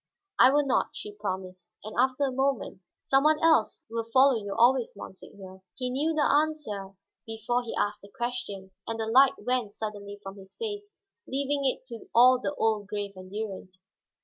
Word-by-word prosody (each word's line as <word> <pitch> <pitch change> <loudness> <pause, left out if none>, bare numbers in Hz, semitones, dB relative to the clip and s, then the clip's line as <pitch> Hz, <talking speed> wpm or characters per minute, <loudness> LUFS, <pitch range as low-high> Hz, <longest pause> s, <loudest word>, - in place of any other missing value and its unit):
"I - - +8
will 290 +1 +3
not," 270 - +2
she 210 - -7
promised. 185 -3 -6 0.2
And 215 +1 -8
after 260 +3 +2
a 270 - +1
moment, 265 -7 -1 0.2
"Some 270 0 +2
one 305 0 +4
else 320 -9 +3
will 230 0 -4
follow 270 +2 +6
you 200 -1 -5
always, 245 +1 +4
monseigneur." 190 -1 -11
He 250 -1 -2
knew 305 +5 0
the 300 - +2
answer 285 -11 0 0.3
before 225 +2 -1
he 235 - -6
asked 205 0 -1
the 200 - -14
question, 235 -6 -4 0.2
and 225 0 -3
the 220 - -1
light 260 +4 +6
went 245 -5 -1
suddenly 205 -2 -6
from 195 +1 -8
his 190 0 -13
face, 415 -2 -5 0.4
leaving 280 +1 -1
it 260 - 0
to 230 -2 -9
all 250 +2 +7
the 290 - -3
old 215 -2 0
grave 205 -1 -4
endurance. 185 -1 -7
230 Hz, 175 wpm, -28 LUFS, 205-270 Hz, 0.4 s, I